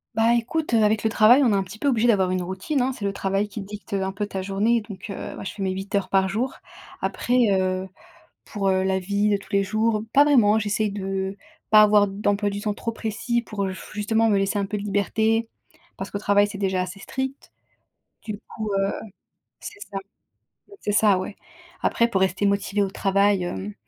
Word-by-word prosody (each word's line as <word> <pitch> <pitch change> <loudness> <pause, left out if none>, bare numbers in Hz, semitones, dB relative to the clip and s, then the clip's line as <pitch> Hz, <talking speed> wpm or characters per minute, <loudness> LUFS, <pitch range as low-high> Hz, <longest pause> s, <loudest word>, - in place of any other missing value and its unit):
Bah, 225 +1 +4
écoute, 240 +4 -1
heu, 220 -1 +4
avec 210 0 +2
le 220 - +2
travail, 240 +6 +6
on 235 - +3
est - - +3
un 195 - +1
petit 190 +3 -11
peu 285 - -2
obligé 240 -1 +2
d'avoir 190 -5 +3
une 185 -1 0
routine, 190 +10 -2
hein! 260 - +1
C'est 235 -6 -6
le 200 - -1
travail 195 +1 -1
qui 210 0 -7
dicte, 205 0 -9
heu, 195 - 0
un 190 - -2
peu 205 +2 -3
ta 195 -2 -5
journée 205 +5 +1
donc 205 0 -10
heu, - - -6
bah, - - -8
je - - -4
fais 200 - -8
mes 190 -1 0
8 195 +2 -6
heures 200 -1 0
par 190 -1 +3
jour. 230 +7 -2 0.5
Après, 245 - -1 0.2
heu, 185 0 0 0.6
pour, 195 -3 -1
heu, 190 0 +2
la 190 0 +1
vie 200 +3 0
de 200 - +3
tous 195 - -16
les 200 0 +3
jours, 215 +1 0
pas 285 +1 +7
vraiment, 220 -7 +4
j'essaie 210 0 0
de 195 -1 -3 0.4
pas 215 0 +9
avoir 210 -1 +5
d'emploi 205 +1 0
du 200 0 -5
temps 210 -1 -1
trop 230 - -3
précis 230 +2 -2
pour, 210 -4 -4
heu, 190 - -3
f - - -11
justement 220 +2 +1
me 205 - +3
laisser 195 +1 0
un 200 - 0
peu 210 - -3
de 200 - -5
liberté 220 +3 0 0.5
parce 195 - -6
qu'au 200 - -3
travail, 205 0 +3
c'est 205 -1 -7
déjà 190 -2 0
assez 185 +2 -6
strict. 265 +5 -5 0.7
Du 210 -2 -5
coup, 215 -2 -4
heu 195 0 +1 0.7
c'est 415 -1 -9
ça, 195 - -6 0.8
c'est 210 - -1
ça, 205 -3 +4
ouais! 195 - -6 0.5
Après 235 - +2
pour 190 -5 0
rester 190 +2 +1
motivée 200 0 +1
au 195 - -1
travail, 195 0 +2
hem, 190 +3 -5
205 Hz, 225 wpm, -24 LUFS, 195-220 Hz, 0.8 s, pas